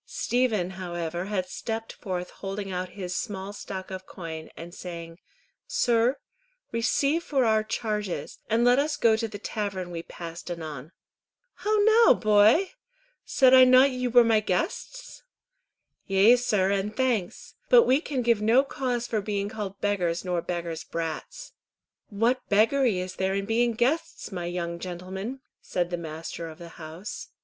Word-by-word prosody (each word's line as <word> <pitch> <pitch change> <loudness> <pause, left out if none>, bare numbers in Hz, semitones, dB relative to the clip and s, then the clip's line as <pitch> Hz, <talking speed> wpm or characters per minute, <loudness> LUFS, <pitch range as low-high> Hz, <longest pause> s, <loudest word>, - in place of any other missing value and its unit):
Stephen 225 -7 0
however 175 -2 -4
had 195 -2 -1
stepped 225 +4 -5
forth 180 -3 -5
holding 195 0 -5
out 180 0 -3
his 180 -2 -4
small 200 -2 -4
stock 190 -2 -7
of 185 0 -7
coin, 160 -3 -7
and 170 +1 -9
saying, 170 -1 -8 0.5
"Sir, 250 - +2 0.5
receive 275 +7 +1
for 270 -6 +1
our 220 -1 +3
charges, 210 -3 -3
and 230 +2 +3
let 245 +2 +5
us 295 +1 0
go 225 -2 +4
to 225 +1 -2
the 210 -1 -7
tavern 200 -4 -4
we 170 -1 -4
passed 170 0 -9
anon." 155 -4 -6 0.6
"How 430 +1 0
now, 445 +2 +6
boy! 215 - +4 0.5
Said 260 -2 +4
I 260 0 +9
not 255 +2 +6
ye 250 0 -2
were 245 0 +6
my 225 -2 +4
guests?" 330 - -3 0.9
"Yea, 200 +4 +6
sir, 210 -6 +1
and 200 +2 -2
thanks; 240 -9 -1 0.2
but 485 -2 +8
we 265 +4 +3
can 270 -6 -2
give 230 -3 +2
no 230 +5 +5
cause 250 -3 -2
for 220 -3 -1
being 200 0 -2
called 205 -3 -6
beggars 180 -4 0
nor 180 -2 0
beggars' 170 -2 -4
brats." - - -5 0.6
"What 230 +4 +1
beggary 225 +1 +3
is 180 0 -5
there 190 0 0
in 195 0 -1
being 235 +2 +2
guests, 290 +6 -1
my 175 -2 -4
young 170 -1 -3
gentlemen?" 190 +8 -6 0.2
said 175 -1 -2
the - - 0
master 165 0 -6
of 155 - -11
the 170 -1 -10
house. 165 +5 -8
205 Hz, 155 wpm, -26 LUFS, 180-245 Hz, 0.9 s, I